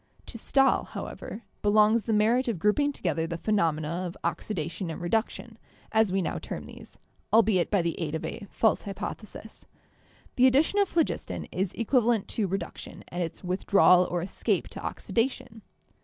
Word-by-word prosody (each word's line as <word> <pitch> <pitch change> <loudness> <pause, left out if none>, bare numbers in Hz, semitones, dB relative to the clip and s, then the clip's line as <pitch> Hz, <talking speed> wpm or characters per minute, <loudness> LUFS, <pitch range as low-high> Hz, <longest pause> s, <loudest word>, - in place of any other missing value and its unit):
To 230 - -8
Stahl, 270 +3 +3
however, 225 - -7 0.2
belongs 215 +2 +4
the 225 - -1
merit 225 +5 +3
of 230 -5 0
grouping 210 - +2
to - - -16
gether 165 -1 0
the 170 0 -4
phenomena 165 -7 +1 0.2
of 175 - -8
oxidation 170 -2 -3
and 160 - -5
reduction, 220 +4 -2 0.3
as 220 -3 +3
we 190 0 +1
now - - -2
term - - -6
these, - - -10 0.3
albeit 215 -6 +4
by 200 -4 +2
the 170 -1 -2
aid 160 -2 -2
of 160 - -4
a 215 -3 -6
false 220 - +2
hypothesis. 210 +2 -7 0.7
The 255 +1 +7
addition 290 +10 +3
of 400 - +3
phlogiston 330 -2 -1
is 185 0 -1
equivalent 235 -2 +2
to 210 -3 -1
reduction 185 -2 -5
and 175 - -4
its 165 +1 -4
withdrawal 180 0 +4
or 175 -1 -1
escape 185 - -1
to - - -8
oxidation. 230 -2 -2
210 Hz, 165 wpm, -27 LUFS, 180-230 Hz, 0.7 s, The